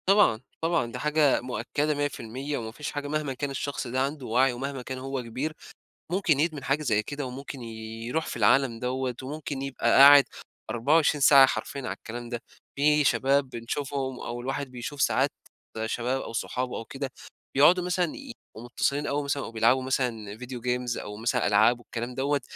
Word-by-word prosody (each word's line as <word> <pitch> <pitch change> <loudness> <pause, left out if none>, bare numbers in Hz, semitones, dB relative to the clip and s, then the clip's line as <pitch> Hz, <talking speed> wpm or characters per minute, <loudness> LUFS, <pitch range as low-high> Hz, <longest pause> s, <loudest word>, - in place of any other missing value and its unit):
طبعًا 195 - +5 0.2
طبعًا، 165 -8 0
دي 125 - -6
حاجة 150 0 +3
مؤكدة 145 +4 -1
100%، 140 -1 -3
وما 110 -1 -5
فيش 145 +5 -6
حاجة 145 0 -4
مهما 150 -2 -2
كان 140 +2 -3
الشخص 140 -1 -3
ده 130 +2 -1
عنده 140 0 -2
وعي 125 +3 +3
ومهما 135 +2 -4
كان 130 +1 -6
هو 135 0 -4
كبير، 130 +7 -4 0.6
ممكن 180 -6 +2
يدمن 155 -3 0
حاجة 140 +3 0
زي 110 -6 +1
كده 145 +2 -5
وممكن 135 +1 -7
يرُوح 115 +5 -4
في - - -4
العالم 120 +2 +3
دوّة 125 0 -2
وممكن 145 0 -5
يبقى 135 -1 -1
قاعد 140 0 +9 0.4
24 145 +6 +2
ساعة 135 0 +9
حرفيًا 140 +1 -3
على 130 - -3
الكلام 120 +1 -8
ده. 120 -1 -4 0.3
في 150 +1 +4
شباب 135 0 +2
بنشوفهم 130 +2 -4
أو 120 +1 -5
الواحد 135 +1 -3
بيشوف 130 +3 -5
ساعات - - +2 0.5
شباب 125 +4 -1
أو - - -7
صحابه 125 +2 -2
أو 115 - -6
كده 135 +1 -5 0.4
بيقعدوا 170 +6 +6
مثلًا 180 0 +1
يبقوا 240 - -10
متصلين 140 +4 -1
أو 145 +1 -1
مثلًا 140 -1 -1
أو - - -7
بيلعبوا 115 +3 +3
مثلًا 115 -6 -2
video 125 +1 -7
games 125 0 -1
أو 105 0 -8
مثلًا 115 +2 0
ألعاب 110 +4 +4
والكلام 120 +1 -6
دوّة. 140 +2 0
135 Hz, 175 wpm, -27 LUFS, 120-145 Hz, 0.6 s, قاعد